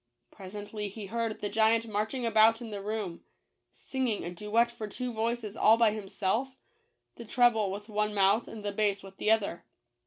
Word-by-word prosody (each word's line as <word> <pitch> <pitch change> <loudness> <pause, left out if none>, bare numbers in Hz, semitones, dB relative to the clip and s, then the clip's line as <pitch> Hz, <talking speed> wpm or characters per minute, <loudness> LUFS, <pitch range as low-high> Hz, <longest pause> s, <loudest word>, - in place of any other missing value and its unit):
Presently 205 +2 -6
he 205 +1 -7
heard 225 +1 -3
the 205 - -1
giant 225 +2 +3
marching 220 +4 -2
about 225 0 +5
in 235 -3 -8
the 200 -1 -5
room, 205 -4 -4 0.5
singing 255 -6 -2
a 175 - -4
duet 215 +6 +1
for 230 -3 -6
two 250 +4 -5
voices 225 -1 -2
all 225 +1 +5
by 230 -2 +4
him 210 -2 -6
self 240 +9 -1 0.3
— - - -49
the 235 - -7
treble 225 -3 +3
with 205 +2 -6
one 210 -1 0
mouth, 200 +3 +3
and 215 -2 -9
the 205 - -1
bass 200 -1 0
with 195 0 -12
the - - 0
other. 215 -5 +1
215 Hz, 190 wpm, -30 LUFS, 205-230 Hz, 0.5 s, about